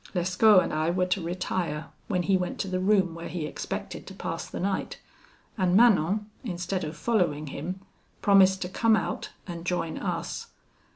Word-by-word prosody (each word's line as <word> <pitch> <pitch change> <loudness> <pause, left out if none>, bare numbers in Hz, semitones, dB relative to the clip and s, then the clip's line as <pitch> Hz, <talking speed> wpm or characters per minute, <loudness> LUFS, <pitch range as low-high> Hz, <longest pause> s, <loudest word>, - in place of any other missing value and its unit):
Lescaut 185 +3 +5
and - - -4
I 155 +1 +1
were 180 +1 +1
to 185 +1 0
retire, 170 -2 -3 0.2
when 180 -4 0
he 195 +2 +3
went 180 -1 -1
to - - -3
the 185 -1 -1
room 190 -2 +3
where 165 0 -7
he 170 -3 -4
expected 150 - -5
to - - -9
pass - - -4
the - - -6
night; 195 +1 -2 0.6
and 185 -1 +3
Manon, 210 -2 +4 0.2
instead 180 -3 -3
of 155 +1 -5
following 170 -7 +1
him, 180 +6 -5 0.4
promised 190 -1 +5
to 180 - -5
come 225 +3 +3
out, - - -2 0.2
and 170 -2 -6
join 175 -2 -2
us. - - -3
185 Hz, 175 wpm, -27 LUFS, 170-195 Hz, 0.6 s, Lescaut